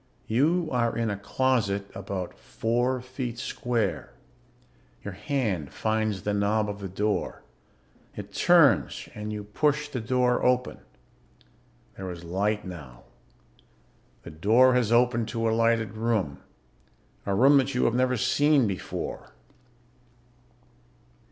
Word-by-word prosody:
You 160 +9 +1
are 120 -2 0
in 115 -2 0
a - - -2
closet 100 -2 0
about 95 -2 -5
four 120 +3 -1
feet 125 -1 -5
square. 120 -2 -2 0.9
Your 105 - -6
hand 105 - -2
finds 110 -1 -1
the 105 - -1
knob 105 +1 +1
of 100 0 -5
the 95 -2 -6
door. 105 +3 -2 0.7
It - - -8
turns - - +4
and 105 0 -6
you 105 -1 -5
push 145 +7 0
the 130 - -4
door 125 +1 +1
open. 125 0 +1 1.2
There 95 -1 -5
is 85 -1 -8
light 105 +5 -1
now. 70 -10 -10 1.2
The - - -9
door 110 +11 +4
has 125 -3 +1
opened 120 -1 +3
to 115 -1 -2
a - - +2
lighted 115 -2 +1
room... 110 -10 -1 0.9
a 100 - +1
room 135 +7 +6
that 135 -1 +1
you 125 - +2
have 115 - +2
never 125 0 +1
seen 145 +2 +3
before. 95 -3 -5
115 Hz, 125 wpm, -26 LUFS, 100-125 Hz, 1.2 s, room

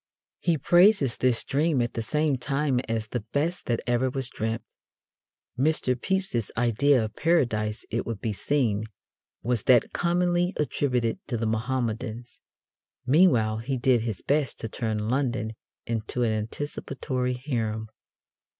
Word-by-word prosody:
He 170 -3 +1
praises 175 - +4
this 125 -3 +1
dream 150 0 +1
at 120 0 0
the 115 - -2
same 150 +4 +1
time 140 -1 0
as 115 -1 -1
"the 120 +3 -3
best 145 +11 -2
that 120 -2 0
ever 120 +1 +1
was 130 -1 -3
dreamt." 110 +1 -2 1.0
Mr. 145 -2 +2
Pepys's 130 - -1
idea 120 +2 +3
of 110 - -8
Paradise, 115 -10 +1
it 115 - 0
would 115 -3 -3
be 110 0 -2
seen, 110 -3 0 0.6
was 120 -3 0
that 125 -3 +4
commonly 175 +1 +1
attributed 125 -6 0
to 120 - -2
the 115 - -2
Mohammedans. 115 0 -2 0.7
Meanwhile 125 -7 +4
he 130 +3 -2
did 125 -1 +3
his 110 -5 -4
best 145 -3 0
to 115 - -3
turn 110 -1 -2
London 120 -3 0 0.3
into 115 +2 -2
an 115 - +2
anticipatory 125 +3 -3
harem. 115 -5 -2
125 Hz, 140 wpm, -26 LUFS, 115-145 Hz, 1.0 s, praises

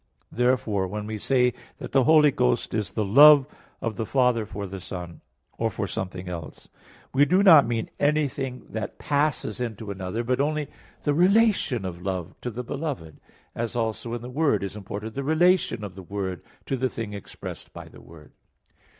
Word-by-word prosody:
Therefore, 115 -6 +1
when 105 +2 -5
we 110 0 -5
say 125 +1 +2 0.2
that - - -8
the 135 -2 +3
Holy 155 -2 +6
Ghost 60 - 0
is 105 -3 -1
the 110 - -2
Love 140 +6 +8 0.4
of 115 -4 -3
the 115 - -2
Father 125 -5 +2
for 100 +2 -5
the 95 0 -7
Son, 90 -2 -7 0.4
or 115 - +1
for 105 -2 -3
something 95 -1 -5
else; 85 -3 -8 0.4
we 135 +2 +5
do 180 +7 +3
not 160 - +8
mean 115 -1 -2
anything 140 -3 0
that 110 0 -5
passes 145 -6 -1
into 110 -3 -4
another, 95 +4 -4
but 125 +3 0
only 150 0 -1 0.3
the 145 - +2
relation 185 - +3
of 90 -1 -6
love 90 -3 -4
to 125 - -3
the 120 +2 -5
beloved; 135 - -5 0.3
as 115 +1 -4
also 115 0 -2
in 120 - -7
the 125 - -7
Word 140 -8 +1
is 100 +1 -5
imported 105 +2 -6
the 140 - -3
relation 160 - +2
of 100 -3 -6
the 95 - -10
Word 95 -2 -4 0.2
to 135 - -1
the 130 +1 0
thing 110 -4 -6
expressed 100 - -9
by - - -10
the - - -15
Word. 80 -2 -15
115 Hz, 185 wpm, -25 LUFS, 100-140 Hz, 0.4 s, Love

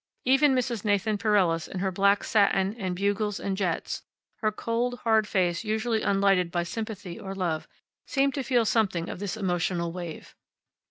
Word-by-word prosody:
Even 270 +2 +5
Mrs. 240 -4 -1
Nathan 205 0 +1
Pereles, 190 -6 +2
in - - -7
her 190 +1 0
black 200 +2 +3
satin 200 -2 +2
and 185 -3 -2
bugles 200 +2 0
and 195 - -2
jets, 185 -4 -2 0.4
her 215 -1 0
cold, 235 +3 -2
hard 220 -2 +3
face 175 -3 0
usually 220 +1 0
unlighted 195 -3 +2
by 175 0 -1
sympathy 200 -2 -6
or 195 0 -6
love, 170 -5 -2 0.4
seemed 275 0 +1
to 280 - -2
feel 245 -2 +2
something 190 -7 +1
of - - -6
this 205 +1 -3
emotional 175 -3 -1
wave. 175 -2 -7
200 Hz, 165 wpm, -27 LUFS, 180-220 Hz, 0.4 s, Even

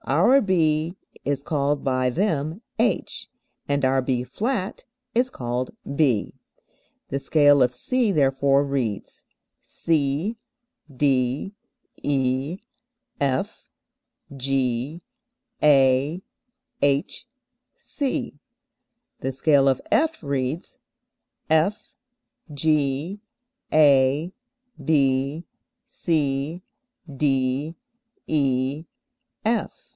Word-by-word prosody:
our 200 - +5
B 165 -3 +1 0.3
is 140 -1 -1
called 145 -2 0
by 130 -1 +1
them 165 - -1 0.2
H, - - -1 0.4
and 140 -1 +1
our 130 0 +3
B[flat] 160 - -2 0.3
is 250 +2 +2
called 125 - -3 0.3
B. 130 -9 +1 0.8
The 140 - -2
scale 145 -1 +4
of 125 -1 +4
C 235 - 0
therefore 140 -3 +3
reads: 125 -8 -3 0.4
C, 160 +7 -1 0.6
D, 135 +5 0 0.5
E, 135 +3 0 0.6
F, 135 -2 -1 0.7
G, 135 +3 -1 0.6
A, 140 +4 +4 0.6
H, 145 - 0 0.5
C; 265 - -4 0.8
the 135 - -2
scale 140 +1 +3
of 130 - +1
F 320 - +2
reads 140 +2 -3 0.7
F, 160 +6 +1 0.6
G, 150 +5 0 0.5
A, 145 +2 +4 0.5
B, 140 +1 +1 0.4
C, 160 - -1 0.5
D, 135 +2 0 0.5
E, 140 +1 0 0.6
F. 225 +1 -1
140 Hz, 80 wpm, -24 LUFS, 135-160 Hz, 0.8 s, our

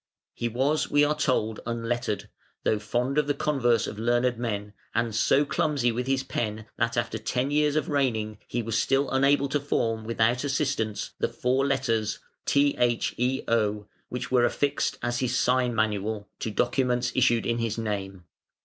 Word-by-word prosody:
He 120 - -2
was, 135 +6 +1
we 145 0 +4
are 145 +1 +3
told, 120 -7 0
unlettered, 120 -1 -2 0.4
though 110 - +2
fond 125 +6 0
of 150 - 0
the 145 - +1
converse 120 -6 +2
of 105 - -6
learned 120 +2 +2
men, 105 -3 -3 0.2
and 115 -1 0
so 135 +6 +3
clumsy 140 -5 +1
with 125 +2 -3
his 135 0 +1
pen 110 -4 -3
that 115 0 0
after 115 -1 -1
ten 125 +5 -1
years 150 0 +2
of 155 - 0
reigning 110 -7 0
he 120 - -2
was 110 0 0
still 135 +1 +1
unable 140 +1 +3
to 145 - +1
form 115 -5 -1
without 115 +2 +1
assistance 135 -7 -1
the - - +1
four 130 +2 +1
letters 115 -6 0 0.3
(THEO) 120 -5 +1 0.2
which 125 - -5
were 125 -1 +4
affixed 140 +3 0
as 120 0 0
his 125 -1 0
sign 125 -1 +2
manual 105 -1 -1
to - - -2
documents 125 +2 +1
issued 115 -2 +3
in 115 0 0
his 115 -1 -1
name. 100 -4 -4
120 Hz, 165 wpm, -27 LUFS, 110-135 Hz, 0.4 s, we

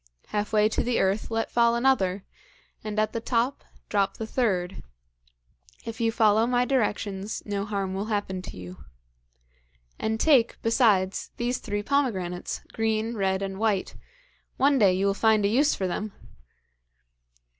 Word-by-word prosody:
Half 210 0 -2
way 215 -1 +4
to 215 - -1
the 245 0 0
earth, 195 +3 0
let 225 0 -2
fall 235 0 +3
another, 205 -7 +1 0.6
and 215 -1 -5
at 215 0 +1
the 230 - -3
top, 240 +3 0 0.2
drop 200 -2 0
the 220 - -4
third. 195 -7 -1 1.0
If 230 +1 -6
you 225 0 +2
follow 220 0 +3
my 245 0 +2
directions 210 -5 -1
no 200 -1 -2
harm 200 -3 -2
will 195 +2 -2
happen 205 -4 -2
to 185 - -9
you. 90 -4 -10 1.2
And 220 0 -1
take, 260 -6 +3
besides, 210 -5 +2
these 245 +1 -1
three 205 0 -3
pomegranates, 200 -10 -1
green, 225 +1 0
red 195 -2 0
and 195 0 -5
white. 215 -4 0 0.6
One 275 0 +3
day 195 -4 +5
you 190 +2 0
will 200 - +2
find 215 0 +3
a - - +3
use 280 +7 +3
for 190 - -2
them!' 210 +4 -3
215 Hz, 155 wpm, -26 LUFS, 195-230 Hz, 1.2 s, day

